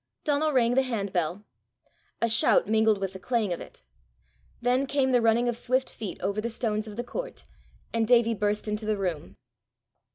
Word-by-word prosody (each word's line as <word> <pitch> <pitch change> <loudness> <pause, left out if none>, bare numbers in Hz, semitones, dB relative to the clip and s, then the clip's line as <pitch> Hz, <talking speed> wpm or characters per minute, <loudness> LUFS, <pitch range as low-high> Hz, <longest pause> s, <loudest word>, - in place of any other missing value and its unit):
Donal 305 0 +1
rang 245 -3 +3
the 265 - +4
handbell. 200 -6 -2 0.8
A - - +4
shout 225 0 +4
mingled 220 0 +3
with 195 -1 -3
the 190 - -8
clang 220 -3 0
of 170 - -6
it. - - -12 0.8
Then 250 +3 +1
came 265 -1 +1
the 245 -1 +4
running 230 +2 +3
of 240 - 0
swift 255 +2 -1
feet 215 -4 -6
over 200 +2 -1
the 235 - -2
stones 220 -2 -2
of 210 - -8
the 240 - -2
court, - - -6 0.5
and 225 -1 +1
Davie 235 -1 +4
burst 210 0 -1
into 210 0 -3
the 215 -1 +1
room. 165 - -3
225 Hz, 185 wpm, -27 LUFS, 205-245 Hz, 0.8 s, the